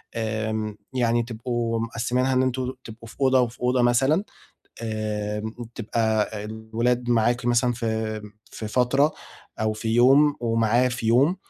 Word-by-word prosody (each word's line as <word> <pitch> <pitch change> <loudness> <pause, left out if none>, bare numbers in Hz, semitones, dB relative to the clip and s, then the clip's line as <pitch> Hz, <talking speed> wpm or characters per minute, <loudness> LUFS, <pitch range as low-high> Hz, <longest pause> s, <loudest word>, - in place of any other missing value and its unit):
آمم 110 -1 -2 0.2
يعني 120 -2 +2
تبقوا 115 0 -2
مقسمينها 120 +3 0
إن 130 0 +3
أنتم 130 0 -1
تبقوا 115 +1 -11
في - - -13
أوضة 130 -1 +4
وفي 120 0 -3
أوضة 125 0 +2
مثلًا، 135 +9 +3 0.6
آمم 110 0 -3 0.2
تبقى 110 -1 0 0.2
الولاد 115 +3 -2
معاكِ 120 +1 +2
مثلًا 120 +1 +3
في 110 -2 -2 0.3
في 110 - -6
فترة 135 +6 +2 0.5
أو 110 0 +1
في 110 +1 -5
يوم 140 +4 +5
ومعاه 115 +2 +2
في 120 -2 -4
يوم، 135 +11 +4
115 Hz, 135 wpm, -24 LUFS, 110-125 Hz, 0.6 s, يوم